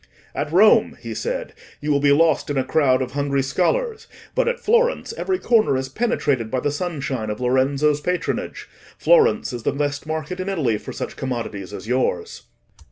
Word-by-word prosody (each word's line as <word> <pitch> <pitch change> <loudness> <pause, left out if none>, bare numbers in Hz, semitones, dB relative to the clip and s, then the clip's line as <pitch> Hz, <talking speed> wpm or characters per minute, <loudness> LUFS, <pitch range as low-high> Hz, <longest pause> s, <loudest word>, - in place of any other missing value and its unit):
'At 150 - -3
Rome,' 200 +6 +5
he - - -6
said, - - -4 0.3
'you 150 0 -2
will 140 - +3
be 140 0 +3
lost 160 +1 +3
in 145 - -1
a 130 - +2
crowd 130 -2 +2
of 125 - -6
hungry 140 -1 0
scholars; 440 - -1 0.3
but - - +1
at 485 0 0
Florence, 475 +1 +1
every 380 -5 -1
corner 220 - +3
is 130 0 -3
penetrated 140 - 0
by 130 - -1
the 145 +2 -1
sunshine 140 -8 -3
of 105 - -4
Lorenzo's 135 +4 +2
patronage: 180 0 -3 0.3
Florence 470 - +3
is 120 - -4
the - - 0
best 145 +1 -2
market 160 +3 -4
in 185 +1 -3
Italy 135 - 0
for - - -8
such - - -6
commodities 115 -7 -4
as 105 - -8
yours. 125 -8 -1
145 Hz, 180 wpm, -22 LUFS, 130-185 Hz, 0.3 s, Rome